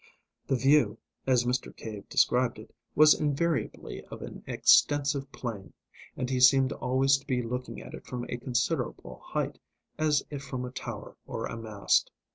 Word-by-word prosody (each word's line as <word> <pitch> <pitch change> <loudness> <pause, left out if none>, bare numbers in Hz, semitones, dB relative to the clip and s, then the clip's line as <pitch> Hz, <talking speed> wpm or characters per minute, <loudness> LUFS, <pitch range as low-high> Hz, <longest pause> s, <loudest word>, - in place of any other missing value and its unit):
The 135 - +2
view, 130 -4 +3 0.3
as 125 -2 +4
Mr. 125 0 -1
Cave 105 -3 -8
described 125 -2 +2
it, 110 - -13 0.2
was 155 0 +8
invariably 155 +2 -2
of - - -9
an - - -9
extensive 140 -1 +3
plain, 100 -8 -6 0.4
and 125 - -2
he 130 0 0
seemed 130 +1 +6
always 135 +1 +2
to 135 - -22
be 125 -2 0
looking 125 +2 -5
at - - -11
it - - -10
from 125 -1 -4
a 120 - -4
considerable 120 - -2
height, - - -3 0.4
as 150 -2 +2
if 145 -2 -5
from 130 -2 -4
a 125 - -7
tower - - -7
or - - -4
a - - -5
mast. 110 -3 +1
130 Hz, 165 wpm, -29 LUFS, 120-140 Hz, 0.4 s, was